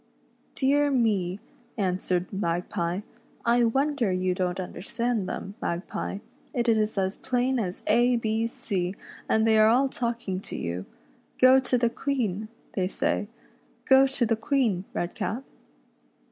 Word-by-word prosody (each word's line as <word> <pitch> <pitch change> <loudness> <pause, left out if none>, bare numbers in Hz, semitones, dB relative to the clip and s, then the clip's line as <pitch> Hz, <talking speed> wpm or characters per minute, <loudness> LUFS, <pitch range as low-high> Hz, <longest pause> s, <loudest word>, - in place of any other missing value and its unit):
" - - -38
Dear 285 +2 +3
me," 205 -8 +1 0.4
answered 185 -2 -1
Magpie, 175 0 -1 0.3
" - - -30
I 240 - +4
wonder 270 -2 +1
you 185 0 +1
don't 180 0 -1
understand 220 +3 -2
them, 195 - -5
Redcap; 175 +3 -3 0.3
it 240 -1 0
is 220 -2 +2
as 190 0 0
plain 255 0 0
as 185 -4 -3
A 245 +1 +4
B 225 0 0
C, 190 -5 -3 0.3
and 220 0 +3
they 220 -1 +5
are 215 - +7
all 265 +4 +4
talking 235 -7 -2
to - - -7
you. 85 +2 -4 0.3
' - - -34
Go 255 +1 +7
to 255 -1 +1
the 235 -1 +2
Queen,' 220 -7 -2 0.3
they 185 -2 0
say. 205 +1 -1 0.3
' - - -36
Go 265 0 +8
to 265 -2 0
the 225 0 +2
Queen, 220 -5 0
Redcap.' 210 +8 -2
220 Hz, 150 wpm, -27 LUFS, 185-245 Hz, 0.4 s, Go